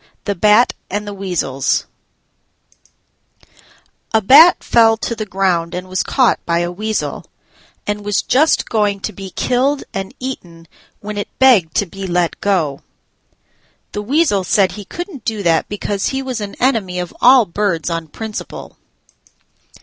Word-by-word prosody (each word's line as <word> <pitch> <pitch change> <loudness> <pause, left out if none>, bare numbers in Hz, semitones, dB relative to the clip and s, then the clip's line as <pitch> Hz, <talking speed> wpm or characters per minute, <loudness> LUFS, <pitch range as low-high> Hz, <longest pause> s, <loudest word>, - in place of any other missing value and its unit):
THE 205 - 0
BAT 210 +5 +4 0.2
AND 205 +2 -3
THE 205 - -6
WEASELS 175 -9 -1 2.3
A 220 - +4
Bat 285 - +7
fell 225 -1 +4
to 230 +2 -3
the 215 -1 -5
ground 180 -3 0
and 180 +1 -5
was 185 0 -1
caught 255 -3 +1
by 170 0 0
a 175 0 -2
Weasel, 215 +4 -3 0.6
and 205 0 -3
was 205 0 0
just 305 +5 +2
going 210 -3 0
to - - -4
be 195 -1 -8
killed 260 +8 0
and 195 0 -5
eaten 175 -11 -7 0.3
when 210 0 -5
it 205 - -3
begged 220 - +4
to 205 - +2
be 195 +1 -7
let 175 -1 -1
go. 165 -9 0 1.1
The 205 - -4
Weasel 255 - +1
said 190 0 +2
he 205 +2 -9
couldn't 345 - -7
do 215 -2 -3
that 165 -2 +1
because 205 -1 -2
he 270 0 -2
was 255 -4 -4
an 200 -1 -6
enemy 220 -8 0
of 180 -1 -5
all 250 -1 +7
birds 180 -3 -1
on 165 -1 -3
principle. 220 +7 -8
205 Hz, 150 wpm, -17 LUFS, 180-230 Hz, 2.3 s, Bat